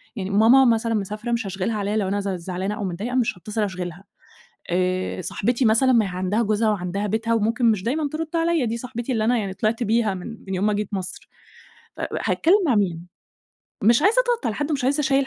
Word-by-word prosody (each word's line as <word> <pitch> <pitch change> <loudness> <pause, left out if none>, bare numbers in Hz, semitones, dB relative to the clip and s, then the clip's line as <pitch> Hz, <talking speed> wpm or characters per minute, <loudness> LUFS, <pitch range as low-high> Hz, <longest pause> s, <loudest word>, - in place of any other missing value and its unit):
يعني 195 -4 -4
ماما 225 +6 +6
مثلًا 230 -1 +2
مسافرة، 210 +3 -3
مش 235 -1 0
هاشغِلها 195 +3 -2
عليَّ 205 +1 -1
لو 210 -3 0
أنا 200 +2 0
ز 200 0 -3
زعلانة 185 +2 -3
أو 210 - -5
متضايقة 200 +7 -3
مش 235 -6 +1
هاتصل 210 +5 -4
أشغِلها، 180 -2 -5 0.7
آآ، 185 +1 -1
صاحبتي 240 +8 0
مثلًا 230 +4 +4
ما 225 -4 +4
هي - - -4
عندها 185 +4 -1
جوزها 215 +1 +1
وعندها 200 +1 -2
بيتها 225 +2 0
وممكن 230 +3 +1
مش 195 -4 -2
دايمًا 290 +5 -1
ترد 320 +1 -2
عليَّ، 330 -4 +2
دي 230 0 -2
صاحبتي 240 +1 -5
اللي 220 -3 0
أنا 245 +2 +3
يعني 200 -4 -2
طِلِعت 220 +5 -1
بيها 220 -1 +1
من 180 -1 -7 0.2
من 190 - -2
يوم 190 +3 0
ما 210 - +2
جيت 205 0 -2
مَصر، 185 -2 -5 0.7
ف - - -6 0.2
هاتكلم 385 +5 +3
مع 255 - +3
مين؟! 175 -4 -1 0.8
مش 235 +6 +4
عايزة 415 +5 +4
أضغط 475 - 0
على 220 - -1
حد 290 +2 -2
ومش 280 -4 -1
عايزة 280 +3 +2
أشيّل 275 -1 +2
215 Hz, 215 wpm, -23 LUFS, 195-245 Hz, 0.8 s, ماما